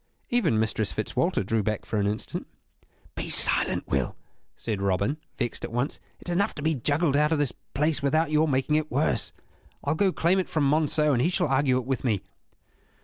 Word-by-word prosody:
Even 190 - +3
Mistress 110 -2 0
Fitzwalter - - 0
drew 110 +3 +1
back 105 0 -2
for 105 - -2
an 100 - +1
instant. 105 +2 -3 0.7
"Be - - -4
silent, - - 0
Will," 65 -2 0 0.4
said 105 -4 -3
Robin, 100 +9 +1 0.2
vexed 120 -3 -3
at - - -4
once. 125 +5 -1 0.2
"It - - -12
is 175 - 0
enough 200 +3 +1
to 145 - -6
be 160 +1 +2
juggled 145 +3 +1
out 150 +2 +3
of 160 - +3
this 145 -3 0 0.2
prize 150 +2 +1
without 155 +3 +2
your 155 +1 +4
making 140 +2 +2
it 155 0 -1
worse. 140 +5 +1 0.5
I'll 145 - +1
go 190 +4 +2
claim 180 +2 +2
it 185 - -2
from 150 -3 +1
Monceux 150 0 +3
and 120 - +2
he 165 - +3
shall 180 0 0
argue 135 -1 +3
it 130 - -2
with 135 -1 -2
me." 110 -7 +1
140 Hz, 205 wpm, -27 LUFS, 115-155 Hz, 0.7 s, your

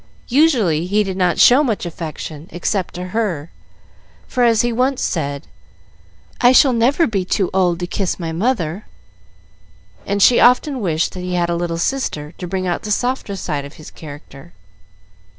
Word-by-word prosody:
Usually 225 - +3
he 210 +3 +2
did 190 -2 -4
not 180 -3 +1
show 260 +5 +6
much 225 -9 -2
affection 160 -2 -7
except 180 +2 -2
to 180 +1 -6
her, 180 -8 -2 0.8
for, 250 - 0
as 230 -2 +4
he 240 -1 0
once 255 +3 0
said, 145 -3 -3 1.0
"I 245 +1 +6
shall 260 0 +6
never 255 +8 +2
be 200 -7 -1
too 185 0 -1
old 180 -2 +1
to - - -1
kiss 185 +1 -2
my 165 -2 -4
mother," 185 -1 -2 1.2
and 200 0 -2
she 235 +4 +6
often 255 +3 +3
wished 165 -5 0
that 185 - -7
he 180 0 -3
had 175 -1 0
a - - 0
little 170 -1 -2
sister, 165 - -2
to 180 - -5
bring 185 +1 -3
out 175 -1 -1
the 210 - -7
softer 245 -1 -1
side 150 -6 -3
of 140 +1 -10
his 155 - -12
character. 145 - -12
185 Hz, 170 wpm, -18 LUFS, 165-235 Hz, 1.2 s, show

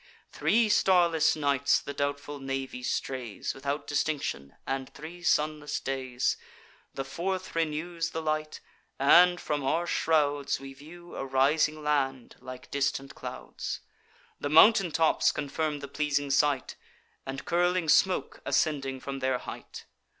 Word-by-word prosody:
Three 230 0 +2
starless 175 -6 +4
nights 140 -2 +2
the 145 - -7
doubtful 145 +1 -3
navy 135 -1 -4
strays, 125 -2 -3
Without 140 +2 -3
distinction, 145 - -2
and 135 -1 -3
three 165 +4 -10
sunless 150 -3 0
days; 130 -2 -1 0.6
The 135 - -3
fourth 185 +7 -3
renews 165 +1 -1
the 160 - -4
light, 155 0 -2 0.4
and, 175 +6 +6
from 145 -2 -2
our 160 +6 +1
shrouds, 145 -5 +1
We 135 0 -9
view 170 +5 -13
a - - -3
rising 150 +3 +2
land, 135 -4 -1
like 130 0 -10
distant 135 0 -1
clouds; - - -6 0.6
The 145 - -2
mountain 185 +3 +6
tops 160 0 +3
confirm 150 0 -2
the 140 - -6
pleasing 145 0 -1
sight, 140 -1 +1 0.5
And 135 0 -6
curling 175 0 +1
smoke 185 +4 +2
ascending 135 -4 0
from 135 0 -5
their 130 -1 +1
height. - - -9
145 Hz, 130 wpm, -28 LUFS, 135-160 Hz, 0.6 s, and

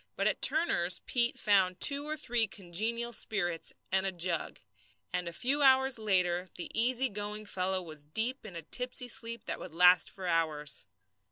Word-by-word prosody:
But - - -2
at - - 0
Turner's 180 - +3
Pete 240 -1 +2
found 190 -3 +2
two 285 0 +5
or 310 0 -3
three 240 -6 +1
congenial 220 +6 -3
spirits 175 -7 -1 0.2
and 190 0 +2
a 195 - -1
jug; 175 -2 -2 0.5
and 180 -1 -2
a - - -4
few 265 +11 -1
hours 265 -2 +4
later 180 -3 0
the 175 - -7
easy 250 +3 +1
going 210 -1 -6
fellow 185 -1 -1
was 155 -3 -11
deep 230 - -2
in 205 -5 -10
a 165 - -7
tipsy 250 - -1
sleep 235 -2 -4
that - - -4
would 170 -3 -10
last 180 +1 +5
for 190 - -10
hours. 155 - -1
195 Hz, 175 wpm, -30 LUFS, 175-240 Hz, 0.5 s, two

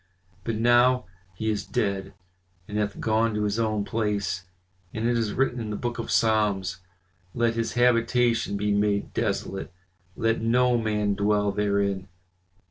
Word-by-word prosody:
But 115 +1 -2
now 120 +2 +4 0.3
he 110 +4 -1
is 105 - -2
dead, 100 -2 -2 0.5
and 105 0 -3
hath 105 -1 -2
gone 110 0 +1
to 105 - 0
his 105 +1 0
own 110 -2 0
place, 100 -5 -1 0.5
and 110 +1 0
it 120 - +2
is 115 -3 0
written 130 -2 +1
in 110 -2 -4
the 105 - -3
book 120 +2 -3
of 115 - -3
the - - -5
Psalms, 105 -5 +2 0.6
'Let 120 -1 +2
his 115 -1 -2
habitation 120 -2 +2
be 105 +1 0
made 100 0 +1
desolate, 100 -3 -2 0.4
let 115 0 0
no 125 +2 +3
man 105 -3 0
dwell 105 0 +1
therein. 100 -1 0
110 Hz, 155 wpm, -26 LUFS, 100-115 Hz, 0.6 s, now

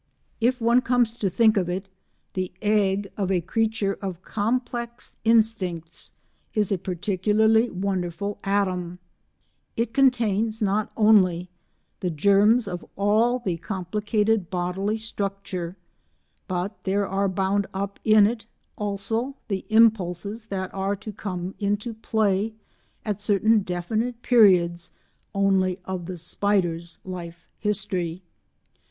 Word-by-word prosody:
If 245 +3 +2
one 235 +2 +4
comes 240 -2 +2
to 205 -5 0
think 220 +3 +4
of 180 -2 +1
it, 190 +2 -3 0.5
the 185 -1 -2
egg 205 -2 +1
of 195 -3 -1
a 185 - +3
creature 215 +2 -1
of 185 -2 -5
complex 235 +2 -3
instincts 210 -8 +1 0.4
is 210 -2 +1
a 195 - +1
particularly 210 +5 +2
wonderful 190 +1 -3
atom; 185 -3 0 0.8
it 230 0 -1
contains 230 -5 +2
not 210 0 0
only 185 -5 +4 0.5
the 180 - -1
germs 200 +8 +4
of 180 -2 -5
all 215 +5 +3
the 175 -4 0
complicated 205 +3 -1
bodily 185 +4 -1
structure, 195 -4 -4 0.7
but 185 +2 -3
there 200 +1 0
are 195 +1 0
bound 195 +2 0
up 200 +1 -4
in 215 -1 +6
it 225 +1 -2 0.3
also 225 +6 -2
the 195 -2 -2
impulses 215 -1 +2
that 190 -2 -4
are 195 +1 -1
to 215 +2 -8
come 185 -2 -5
into 205 +3 -1
play 215 -1 0 0.5
at 210 -2 -2
certain 210 +2 +3
definite 215 +6 -2
periods 180 -7 +4 0.5
only 190 -2 +2
of 185 -2 -4
the 185 -1 -5
spider's 170 -1 -1
life 175 -2 -7
history. 190 -4 -2
200 Hz, 120 wpm, -25 LUFS, 185-220 Hz, 0.8 s, in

